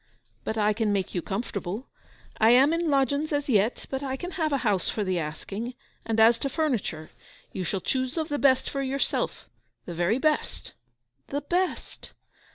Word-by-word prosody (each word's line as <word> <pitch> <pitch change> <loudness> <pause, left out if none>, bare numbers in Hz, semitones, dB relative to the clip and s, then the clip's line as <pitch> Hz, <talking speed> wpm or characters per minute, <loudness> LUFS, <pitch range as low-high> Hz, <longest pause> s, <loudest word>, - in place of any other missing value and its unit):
'But 220 - -3
I 210 0 +3
can 215 -1 0
make 195 -2 -1
you 175 - -1
comfortable. 200 - -4 0.5
I 220 - +6
am 265 +6 +6
in 335 -1 0
lodgings 280 +2 +1
as 290 -1 0
yet, 220 -2 +2
but 265 0 -2
I 265 -1 -3
can 355 +6 -5
have 320 -4 -1
a 280 - +3
house 200 -4 +2
for 215 - -1
the 185 -2 0
asking; 195 +10 -5 0.3
and 225 -1 +1
as 230 +1 +6
to 275 - -1
furniture, 240 - -1 0.4
you 185 - -3
shall 190 +2 -2
choose 260 +2 -1
of 315 -1 0
the 290 -2 -2
best 260 -2 +4
for 275 - -2
yourself—the 265 -8 -3
very 175 +7 +1
best.' 305 +2 -1 0.6
'The 285 +1 -2
best! 355 +5 -2
250 Hz, 175 wpm, -27 LUFS, 205-285 Hz, 0.6 s, I